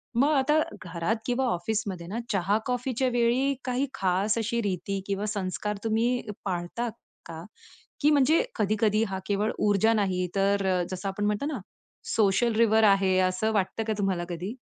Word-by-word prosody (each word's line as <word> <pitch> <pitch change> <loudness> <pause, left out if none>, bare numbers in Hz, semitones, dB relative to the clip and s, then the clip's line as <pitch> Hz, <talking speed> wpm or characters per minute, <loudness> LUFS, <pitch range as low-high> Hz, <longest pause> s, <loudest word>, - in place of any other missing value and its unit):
मग 285 +5 +3
आता 295 +3 +3 0.2
घरात 175 +5 -1
किंवा 255 +1 0
ऑफिसमध्ये 190 -2 -3
ना 220 +5 -4
चहा 195 +3 +2
कॉफीच्या 250 0 -1
वेळी 245 +4 +2
काही 255 +2 0
खास 195 +4 +1
अशी 230 +1 -1
रीती 195 0 -2
किंवा 200 +1 -2
संस्कार 205 0 -3
तुम्ही 230 +3 +1 0.2
पाळतात 190 +6 -3 0.3
का? 165 0 -8 0.6
की 300 +1 +4
म्हणजे 295 - +4
कधी-कधी 215 +1 +2
हा 190 -1 -3
केवळ 205 +1 0
ऊर्जा 210 +2 +3
नाही, 185 -3 0
तर 195 0 +2
अ, 180 -1 +2
जसं 185 +1 -4
आपण 205 +2 -3
म्हणतो 210 +7 0
ना 285 -8 -3 0.6
सोशल 215 +2 +3
रिव्हर 220 -1 +4
आहे, 195 -2 +4
असं 185 +4 +1
वाटतं 210 +2 -1
का - - +2
तुम्हाला 190 -3 0
कधी? 180 +7 -4
210 Hz, 160 wpm, -27 LUFS, 190-235 Hz, 0.6 s, की